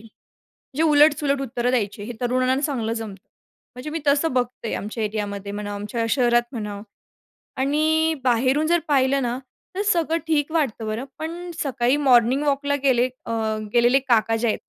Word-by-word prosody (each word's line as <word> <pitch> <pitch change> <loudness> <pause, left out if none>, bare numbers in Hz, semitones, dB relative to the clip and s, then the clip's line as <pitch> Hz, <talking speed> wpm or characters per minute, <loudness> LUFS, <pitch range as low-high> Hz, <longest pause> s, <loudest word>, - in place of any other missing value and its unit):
म्हणजे 225 0 -21 0.6
उलट-सुलट 290 -2 +4
उत्तरं 245 -1 -2
द्यायची 210 -4 -1
हे 240 +3 -6
तरुणांना 255 +2 +1
चांगलं 235 -7 -1
जमतं. 210 -4 -7 0.5
म्हणजे 250 +5 -6
मी 325 +1 -3
तसं 285 +1 +2
बघते 245 -2 -2
आमच्या 215 +2 -4
एरियामध्ये 205 -1 -4
म्हणा, 205 0 -5
आमच्या 210 +3 -3
शहरात 240 -2 +3
म्हणा 210 -4 -5 0.8
आणि 315 +3 +2
बाहेरून 255 +5 +2
जर 345 +2 +3
पाहिलं 275 -1 +2
ना, 245 +1 -2 0.4
तर 405 - 0
सगळं 335 -5 +1
ठीक 300 -2 +1
वाटतं 265 -9 -1
बरं 220 +4 -3
पण 340 +3 -6
सकाळी 260 -1 +1
मॉर्निंग 260 -1 +4
वॉकला 285 0 +1
गेले 255 -2 +3 0.2
अ, 230 - -3 0.4
गेलेले 240 +2 +4
काका 230 -4 +2
जे 235 +1 -1
आहेत - - 0
255 Hz, 155 wpm, -23 LUFS, 225-290 Hz, 0.8 s, उलट-सुलट